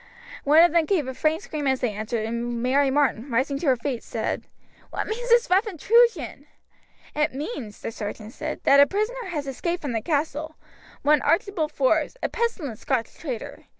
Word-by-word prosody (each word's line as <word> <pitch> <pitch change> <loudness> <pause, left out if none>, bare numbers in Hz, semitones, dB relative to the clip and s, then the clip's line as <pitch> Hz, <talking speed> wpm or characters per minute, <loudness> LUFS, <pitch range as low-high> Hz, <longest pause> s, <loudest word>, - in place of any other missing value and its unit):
One 305 +4 +7
of 345 - +5
them 335 -1 +3
gave 320 -7 +1
a 260 - -4
faint 310 +4 0
scream 295 -2 -3
as 265 -1 +2
they 240 -4 0
entered, 215 +1 -3
and 235 +1 -3
Mary 270 +2 +3
Martin, 270 -2 +1
rising 265 +3 0
to 315 - -3
her 260 - +5
feet, 245 0 -3
said: - - -3 0.4
"What - - -3
means 485 +3 -4
this 475 0 +5
rough 385 +5 +3
intrusion?" 370 - +2 0.7
"It 300 -3 0
means," 270 - -6
the - - -4
sergeant 215 +1 -6
said, - - -5
"that 280 0 +6
a 285 - +8
prisoner 440 - -2
has 305 -6 -3
escaped 340 +6 -3
from 285 - -2
the 225 -2 -1
castle, 310 +2 -2 0.5
one 295 0 +4
Archibald 335 -2 +1
Forbes, 305 - +1
a - - +1
pestilent 390 - -2
Scotch 250 -5 -1
traitor. 255 -9 -6
290 Hz, 185 wpm, -25 LUFS, 250-345 Hz, 0.7 s, a